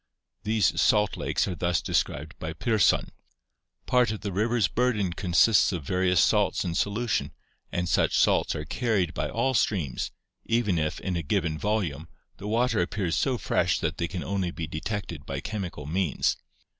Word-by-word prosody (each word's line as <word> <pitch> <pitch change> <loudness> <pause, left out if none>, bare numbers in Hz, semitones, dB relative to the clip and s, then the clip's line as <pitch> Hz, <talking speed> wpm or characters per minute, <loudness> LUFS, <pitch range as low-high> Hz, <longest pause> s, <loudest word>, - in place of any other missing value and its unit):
These 110 -4 +1
salt 105 -2 +3
lakes - - -1
are 95 - -2
thus 85 0 0
described 75 +2 -1
by 80 +1 -4
Pirsson: 110 +5 +2 0.8
Part 125 -2 +3
of 110 -1 -4
the 100 - -3
river's 110 +2 +1
burden 105 -5 0
"consists 95 +5 +4
of 85 -5 -4
various 90 +3 +1
salts - - +2
in 85 - -2
solution 100 -6 -1 0.4
and 90 0 -1
such - - +2
salts - - +3
are 75 - -4
carried 100 -4 0
by - - -2
all 130 +3 0
streams, 90 - 0 0.3
even 110 -7 +1
if, 75 0 -2
in 95 -2 -2
a 85 - -1
given 80 0 0
volume, 85 -5 -2 0.3
the 100 - -7
water 115 -1 +2
appears 90 -2 -1
so 130 +5 +1
fresh 85 -6 +1
that 80 0 -2
they 85 - 0
can 90 0 -5
only 95 -2 -1
be 85 -2 -5
detected 85 -1 -5
by 70 0 -3
chemical 90 -6 -5
means. 85 +1 0
95 Hz, 170 wpm, -27 LUFS, 85-110 Hz, 0.8 s, consists